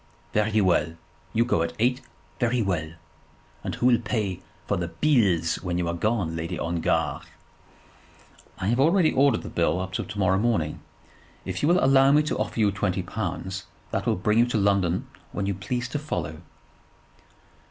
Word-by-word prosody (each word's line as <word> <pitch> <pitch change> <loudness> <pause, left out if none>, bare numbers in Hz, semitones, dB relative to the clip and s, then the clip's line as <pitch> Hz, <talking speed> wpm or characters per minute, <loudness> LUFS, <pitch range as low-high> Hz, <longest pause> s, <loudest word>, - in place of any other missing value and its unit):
"Very 105 0 +2
well. 85 -3 +2 0.4
You 115 +1 +2
go 120 -9 +1
at 85 - -2
eight, 125 +3 +1 0.4
very 120 0 +1
well. 85 -7 -1 0.7
And - - -3
who - - -2
will 125 -2 +5
pay 100 -6 -2 0.2
for - - 0
the 85 -1 -2
'beels' 95 - +2
when 90 -2 -2
you 90 -1 -1
are 85 - -1
gone, 95 -2 -1
Lady 80 0 -3
Ongar?" 80 -3 0 1.4
"I 95 0 -3
have 120 +3 +1
already 165 +3 +4
ordered 140 +1 +3
the - - -6
bill 90 - +1
up 95 0 -5
to 105 +2 -4
morrow 95 -1 +2
morning. 105 -10 0 0.7
If - - -4
you 145 - +2
will 175 - +4
allow 135 0 +6
me 150 +1 +5
to 150 - -2
offer - - -2
you 105 -2 +4
twenty 95 -1 -1
pounds, 95 0 -4 0.2
that - - -2
will - - +3
bring 105 +4 +1
you 120 - +5
to 120 - 0
London 100 -3 +1 0.3
when 100 - -2
you 100 - 0
please 120 +6 -3
to 145 - -2
follow." 85 - -4
100 Hz, 175 wpm, -25 LUFS, 85-120 Hz, 1.4 s, allow